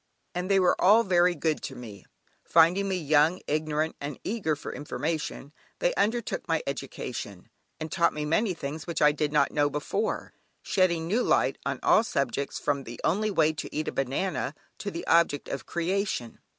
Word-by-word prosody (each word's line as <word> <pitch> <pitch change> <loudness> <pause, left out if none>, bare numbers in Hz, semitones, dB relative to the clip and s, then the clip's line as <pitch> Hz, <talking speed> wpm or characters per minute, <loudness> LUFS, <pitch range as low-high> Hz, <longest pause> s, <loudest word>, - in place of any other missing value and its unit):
And 180 +1 -3
they 195 -1 +4
were 185 - +4
all 210 +5 +6
very 180 -2 +3
good 155 0 -1
to 135 - -6
me. 110 -5 -10 0.4
Finding 175 +4 +4
me 190 - 0
young, 155 +1 +3
ignorant, 155 +1 -1
and 145 0 -5
eager 195 -8 -1
for 145 - -7
information, 150 -1 -4 0.2
they - - +1
undertook 235 - -1
my 165 -1 0
education, 125 -7 -6 0.3
and 155 0 -5
taught 170 -2 +3
me 150 0 -4
many 185 +5 +1
things 150 +1 -6
which 170 - -2
I 150 0 +6
did 150 0 -1
not 150 - +3
know 145 -1 +2
before, 145 0 -2 0.3
shedding 170 -3 +1
new 210 +9 +1
light - - +2
on - - -2
all 220 - +5
subjects, 140 - -2
from 140 -2 -1
"the 120 -1 -9
only 210 +6 +1
way 160 -5 +3
to 155 - -6
eat 155 - -2
a - - -4
banana," 140 +3 -2 0.2
to 205 - -3
the 170 -3 -6
object 165 -4 +3
of 135 - -5
creation. 175 - -2
160 Hz, 180 wpm, -27 LUFS, 145-185 Hz, 0.4 s, all